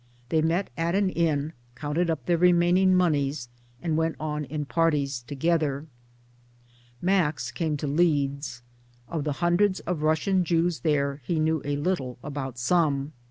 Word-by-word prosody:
They 160 -1 +2
met 170 +5 0
at 165 +2 0
an 195 -1 +2
inn, 160 -3 0 0.2
counted 150 +6 -1
up 150 -7 -2
their 170 -1 +2
remaining 180 +1 +4
monies, 145 -7 +1 0.3
and 160 -3 0
went 160 0 0
on 150 -1 -3
in 150 +2 -4
parties 145 -4 +1
together. 150 -1 0 1.2
Max 180 -5 +1
came 160 -3 -1
to 145 - -4
Leeds. 140 -4 0 0.4
Of 155 -3 -3
the 150 - 0
hundreds 185 +2 +3
of 175 -4 -3
Russian 160 +5 +2
Jews 170 0 +1
there 140 -2 0
he 160 +5 -1
knew 155 -1 +1
a 145 0 -1
little 145 -5 -2
about 135 -4 -5
some. 145 +1 +1
155 Hz, 150 wpm, -26 LUFS, 145-175 Hz, 1.2 s, remaining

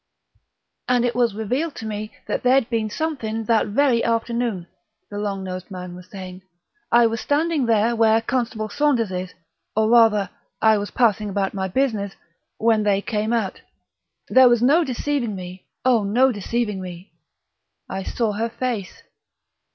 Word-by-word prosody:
"... - - -20
and 245 -1 +3
it 240 - 0
was 240 -4 +1
revealed 255 +9 -2
to 225 - -7
me 215 0 -5
that - - -2
there'd 255 0 +3
been 225 -2 0
something 225 -6 -3
that 220 0 +2
very 240 +2 +2
afternoon," 230 -4 -1 0.5
the 205 - -4
long 200 -2 -3
nosed 185 0 -6
man 180 -2 -7
was 180 0 -12
saying. 185 -2 -9 0.5
"I 235 0 +6
was 225 0 -1
standing 300 -2 +1
there, 225 +1 +3
where 225 -1 +4
Constable 225 -2 -2
Saunders 245 -4 +1
is 180 0 -5 0.4
or 220 +1 +2
rather, 225 -4 +5 0.3
I 220 -1 +4
was 205 -1 -4
passing 215 -3 +1
about 195 -1 -1
my 190 -1 -2
business, 210 -3 -1 0.4
when 225 -1 +3
they 200 -1 +1
came 215 0 -1
out. 220 -5 -1 0.7
There 260 -1 +6
was 240 -1 +3
no 305 +7 +5
deceiving 260 -4 -2
me, 185 0 -9 0.2
oh, 245 -4 +4
no 245 +7 +3
deceiving 210 -1 -2
me! 180 +1 -9 0.8
I 190 - -4
saw 225 +3 -1
her 225 +3 -2
face...." 230 -5 -4
220 Hz, 160 wpm, -22 LUFS, 200-240 Hz, 0.8 s, I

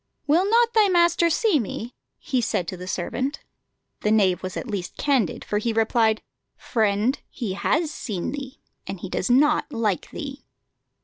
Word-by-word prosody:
"Will 340 +7 +3
not 470 +1 +4
thy 435 -2 +5
master 345 -1 +4
see 365 -1 +3
me?" 230 +1 -5 0.2
he 260 -4 -1
said 180 -6 -1
to - - -4
the 180 0 -8
servant. 255 - -2 0.6
The 210 - 0
knave 195 -4 +3
was 185 0 -5
at - - -4
least 200 -5 -4
candid, 265 - 0
for 210 - 0
he 230 +1 -1
replied: 225 0 +2 0.3
"Friend, 220 +3 +1
he 225 -7 -4
has 310 - 0
seen 200 - -4
thee, 275 -1 -7 0.2
and 195 -2 -6
he 190 - -5
does 185 - -2
not 295 +5 +3
like 215 -7 -1
thee." 280 -3 -7
240 Hz, 170 wpm, -24 LUFS, 205-295 Hz, 0.6 s, thy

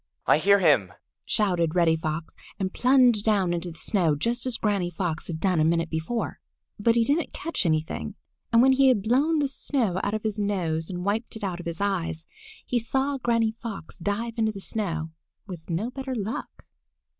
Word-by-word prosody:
"I - - +4
hear 200 +4 +5
him!" 135 - +3 0.3
shouted 180 -6 +1
Reddy 170 -2 +4
Fox, 160 0 -4 0.3
and 190 -1 -2
plunged 250 -4 +4
down 200 -5 +2
into 175 +1 -3
the 165 - -11
snow 170 -5 +1
just 235 - -1
as 250 - +1
Granny 200 -5 0
Fox 170 -2 -3
had 160 -2 -4
done 180 -2 +1
a - - +4
minute 165 +1 +1
before. 160 +9 -3 0.4
But 230 +2 +3
he 235 - +4
didn't 290 +6 0
catch 320 - -2
anything, 155 0 -1 0.4
and 230 0 +6
when 265 - +6
he 270 +1 +5
had 240 -7 +3
blown 275 +9 +2
the 290 -2 +2
snow 255 -8 -1
out 205 +2 0
of 215 - -4
his 215 -1 -2
nose 170 -6 -1
and 180 -1 -4
wiped 220 +4 -1
it 220 - -8
out 180 -3 -2
of 175 - -7
his 165 -1 -4
eyes, 170 -5 -2 0.4
he 245 - 0
saw 270 +4 -1
Granny 230 -2 +2
Fox 210 -7 -7
dive 205 +6 -2
into 220 -1 +2
the 200 - -8
snow 170 -6 -2 0.3
with 180 -5 -9
no 195 +9 -2
better 265 0 -5
luck. 215 -1 -5
200 Hz, 195 wpm, -26 LUFS, 170-230 Hz, 0.4 s, and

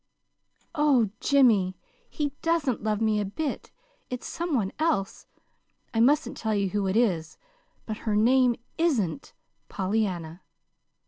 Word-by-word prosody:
"Oh, 280 - +3
Jimmy, 220 -10 +3 0.3
he 290 -2 -2
doesn't 330 -7 0
love 215 0 -1
me 215 -1 +2
a - - 0
bit. 280 +9 -4 0.4
It's 250 -1 -5
some 340 -3 -2
one 200 -6 0
else. 205 -12 -1 0.7
I 225 - 0
mustn't 285 +6 +3
tell 220 -1 -1
you 200 -1 0
who 205 0 0
it 190 +3 +1
is 175 -10 0 0.5
but 215 -1 -4
her 215 -2 -2
name 245 +3 +4 0.2
isn't 270 - 0 0.4
Pollyanna." 185 -4 -2
220 Hz, 130 wpm, -26 LUFS, 195-275 Hz, 0.7 s, name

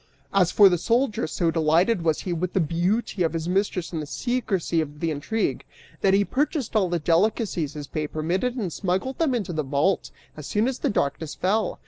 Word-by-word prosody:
As 190 -3 +3
for 205 - +7
the 175 -3 +2
soldier, 235 - +1
so 165 +1 0
delighted 170 +6 +2
was 160 -2 +1
he 180 - -3
with 175 +2 -2
the - - +2
beauty 180 +6 0
of 165 -1 +1
his 165 0 -3
mistress 185 -1 -1
and 160 - -2
the 150 - -6
secrecy 200 - -1
of 150 -1 -7
the 165 0 -1
intrigue, 185 +10 -2 0.4
that 195 0 +4
he 200 0 +3
purchased 280 - -1
all 195 -4 +3
the 175 - 0
delicacies 170 -1 +1
his 145 -1 -5
pay 150 +1 -3
permitted 180 +12 -1
and 195 - -3
smuggled 190 +8 -2
them 305 -6 +2
into 200 -7 -3
the 155 - 0
vault 145 +7 0 0.3
as 150 -2 -8
soon 215 +3 +1
as 260 -1 -2
darkness 150 -4 -1
fell. 205 +2 0
180 Hz, 200 wpm, -25 LUFS, 160-215 Hz, 0.4 s, for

